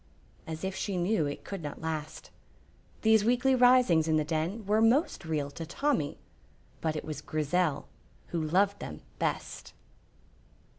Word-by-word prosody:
as 160 +1 -6
if 190 0 -2
she 195 -1 -2
knew 175 -3 +1
it 145 - -6
could 195 -3 -6
not 145 -2 -6
last. 155 -1 -5 0.7
These 220 -1 +5
weekly 250 +4 +3
risings 245 -10 +5
in 160 -1 +3
the 155 - +2
Den 165 +8 -2
were 210 +2 +2
most 230 - +2
real 150 -3 -2
to 165 - -7
Tommy, 170 - -1 0.6
but 160 -1 -1
it 155 - -4
was 150 -2 -5
Grizel 155 0 0 0.4
who 170 - -1
loved 195 +6 +2
them - - -7 0.2
best. - - -3
175 Hz, 150 wpm, -30 LUFS, 155-220 Hz, 0.7 s, These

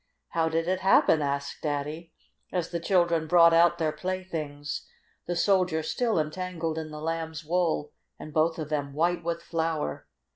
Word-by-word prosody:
"How 165 -1 +1
did 165 +1 -1
it 185 0 +1
happen?" 185 -4 +4
asked 140 0 -2
Daddy, 150 +3 -3 0.4
as 175 -3 -1
the 170 - -1
children 170 -3 +2
brought 170 0 +6
out 170 +1 +5
their 160 -2 0
playthings, 155 -4 -4 0.4
the 175 - -1
Soldier 180 -3 +2
still 230 +5 0
entangled 165 0 -3
in 155 -1 -6
the 150 0 -8
Lamb's 160 0 -4
wool, 165 -3 0 0.3
and 155 - -9
both 160 +2 +2
of 155 -2 -5
them 145 -2 -2
white 170 +2 +1
with 170 0 -3
flour. 160 - -2
165 Hz, 160 wpm, -27 LUFS, 155-175 Hz, 0.4 s, brought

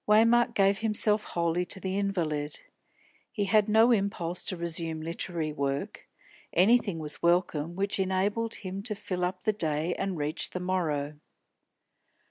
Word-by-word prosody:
Waymark 230 +3 +4
gave 195 0 +3
himself 215 -1 +2
wholly 170 +1 0
to 190 - -3
the 190 0 -3
invalid. 165 -7 -2 0.7
He 205 -3 -1
had 210 +2 +3
no 225 +3 +5
impulse 195 -5 -1
to 185 - -2
resume 165 -1 -2
literary 165 -1 -2
work; 140 -1 -3 0.4
anything 200 0 +3
was 150 -2 -3
welcome 170 -2 +1
which 200 +1 -1
enabled 200 +4 0
him 190 -1 -6
to 210 0 -3
fill 180 -2 -4
up 180 +1 -2
the 215 - +2
day 160 -3 0
and 195 -2 -3
reach 150 +2 0
the 180 - -5
morrow. 155 -6 -2
185 Hz, 145 wpm, -28 LUFS, 165-205 Hz, 0.7 s, no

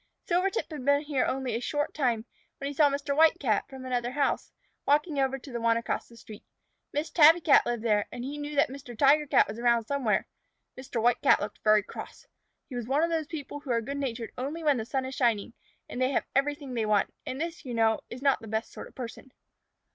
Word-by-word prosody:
Silvertip 370 +2 0
had 295 -5 -6
been 285 +1 +3
here 285 -4 0
only 260 -2 -2
a 230 - -1
short 290 +4 -2
time, 240 -6 0 0.3
when 275 - -4
he 285 - -4
saw 290 0 +5
Mr. 280 0 -2
White 320 +1 +5
Cat, 220 -7 0
from 265 -1 -9
another 245 -1 -2
house, 285 0 0 0.3
walking 295 +1 +2
over 270 0 +1
to 270 +1 -12
the 235 -1 -4
one 230 0 +3
across 230 - -3
the 235 - -16
street. 215 -2 -12 0.5
Miss 295 +2 -2
Tabby 320 +1 +7
Cat 300 -4 +5
lived 240 -2 -2
there, 210 -3 +2
and 240 - -6
he 285 +3 -5
knew 295 0 -5
that 290 +1 +3
Mr. 265 -4 -9
Tiger 290 +4 +4
Cat - - +4
was 220 - -7
around 235 -1 +3
somewhere. 265 -5 0 0.5
Mr. 255 -2 -5
White 240 +2 +2
Cat - - +5
looked 205 - -5
very 215 -1 +5
cross. - - -10 0.4
He 260 - -8
was 240 -2 -4
one 280 +5 +2
of 335 - +1
those 320 -2 -1
people 290 -3 -6
who 285 - -12
are 235 -1 +2
good 275 +5 -5
natured 240 -5 -4
only 295 +6 -4
when 295 -3 +3
the 220 - -3
sun 265 +2 -2
is 260 - -5
shining 235 -4 0 0.3
and 250 - -5
they 255 - +3
have 275 - 0
everything 280 -1 0
they 225 -3 -1
want, 210 -2 +2
and 260 - -4
this, 340 +2 -4
you 250 -4 -5
know, 225 -1 +3
is 255 +3 -8
not 275 -1 +3
the 225 - -10
best 220 +1 -3
sort - - -8
of - - -19
a - - -48
person. 250 +1 -8
265 Hz, 240 wpm, -28 LUFS, 235-290 Hz, 0.5 s, Tabby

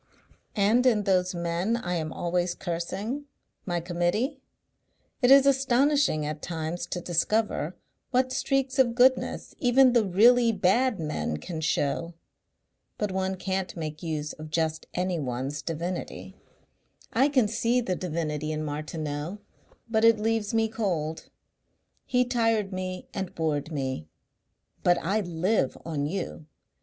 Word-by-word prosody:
And 215 +4 +3
in 215 -4 +3
those 185 -2 +1
men 170 +6 0
I 180 -6 -3
am 160 -2 -2
always 175 0 -1
cursing, 195 +10 -4 0.4
my 175 -1 0
Committee, 175 - -1 0.8
it 245 - +4
is 275 0 +8
astonishing 270 - +3
at 150 +1 -4
times 165 0 -4
to 180 - -3
discover 175 -1 0 0.3
what 255 0 +2
streaks 270 0 0
of 240 -3 +4
goodness 260 +1 +2
even 255 0 +5
the 235 -2 +4
really 230 +5 +5
bad 215 +4 +2
men 150 - -2
can 160 - -6
show.... 160 +2 -1 0.8
But 210 -2 -1
one 190 0 -1
can't 190 -1 -3
make 155 -2 -5
use 155 -3 -3
of 155 0 -9
just 160 0 -1
anyone's 145 -6 -2
divinity. 170 +4 -5 0.8
I 265 +5 +4
can 260 -6 +3
see 230 +3 +1
the 205 -7 -1
divinity 155 -4 -3
in 155 0 -2
Martineau 150 +3 -4 0.5
but 220 -1 +1
it 230 -1 +6
leaves 220 -1 0
me 225 -1 +2
cold. 175 -8 -3 0.8
He 250 0 +2
tired 225 -5 +1
me 185 0 -4
and 190 -2 -4
bored 155 -1 -1
me.... 130 - -3 0.7
But 175 0 +4
I 210 +3 0
live 175 -3 0
on 150 -3 -2
you. 170 -3 -5
185 Hz, 135 wpm, -27 LUFS, 160-230 Hz, 0.8 s, is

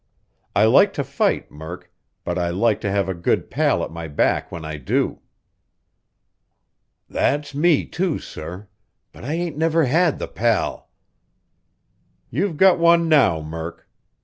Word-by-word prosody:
I 105 - +5
like 140 - +5
to 140 - -2
fight, 140 +2 -1
Murk, 80 +4 -9 0.3
but - - -3
I 85 -1 0
like 105 +5 +1
to 100 - -2
have 100 -1 0
a 95 - -1
good 85 -1 -1
pal - - +1
at - - -5
my 85 0 -6
back 75 - 0
when 80 -2 -7
I 75 -1 -5
do." 65 -2 -1 1.9
"That's 145 0 -1
me, 155 +1 +3
too, 175 -3 -1
sir; 90 +6 -9 0.4
but - - -14
I 140 +5 -3
ain't 165 -2 -3
ever 165 -1 +3
had 160 +4 +2
the - - -5
pal." 115 -2 -1 1.4
"You've 165 - -1
got 190 0 +5
one 170 0 +4
now, 125 - +4
Murk. 80 +2 -7
120 Hz, 150 wpm, -21 LUFS, -, 1.9 s, I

